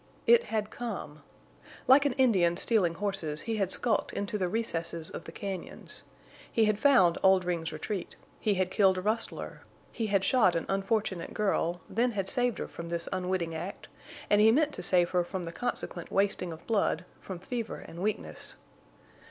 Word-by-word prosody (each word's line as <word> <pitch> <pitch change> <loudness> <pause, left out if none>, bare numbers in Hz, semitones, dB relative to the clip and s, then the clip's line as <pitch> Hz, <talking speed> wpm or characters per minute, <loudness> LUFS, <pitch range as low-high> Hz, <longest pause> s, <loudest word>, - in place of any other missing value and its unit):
It 475 0 +6
had 215 -1 -2
come. 200 -11 -6 0.6
Like 275 +2 +6
an 280 - +2
Indian 195 -10 +3
stealing 190 -6 +2
horses 165 -6 -1
he 225 -1 -2
had 195 -2 0
skulked 225 +2 +2
into 200 +2 -3
the 185 - +1
recesses 170 -6 -2
of - - -7
the - - -8
cañons. 190 0 -6 0.5
He 225 - +3
had 215 -1 +1
found 215 -12 +5
Oldring's 180 -4 +2
retreat; 175 +5 -5 0.2
he 210 -2 +1
had 185 0 0
killed 190 -2 +4
a - - -1
rustler; 215 +4 -3 0.3
he 225 -2 -2
had 200 -2 +2
shot 205 -7 +4
an 165 - -1
unfortunate 195 -2 -1
girl, 180 -4 0
then 240 +2 +1
had 195 -2 -2
saved 245 -2 +2
her - - -4
from 170 0 -8
this 170 0 -3
unwitting 180 -2 -1
act, 170 +5 -6 0.4
and 205 0 +4
he 220 +1 +7
meant 300 +4 +2
to - - -5
save 175 -1 +2
her 180 -1 +2
from 180 +1 -5
the 165 - -5
consequent 175 -4 -4
wasting 195 -3 +1
of 160 0 -10
blood, 200 -6 +1
from 190 - -7
fever 230 +5 -4
and 170 - -9
weakness. 210 +2 -3
195 Hz, 175 wpm, -30 LUFS, 175-220 Hz, 0.6 s, he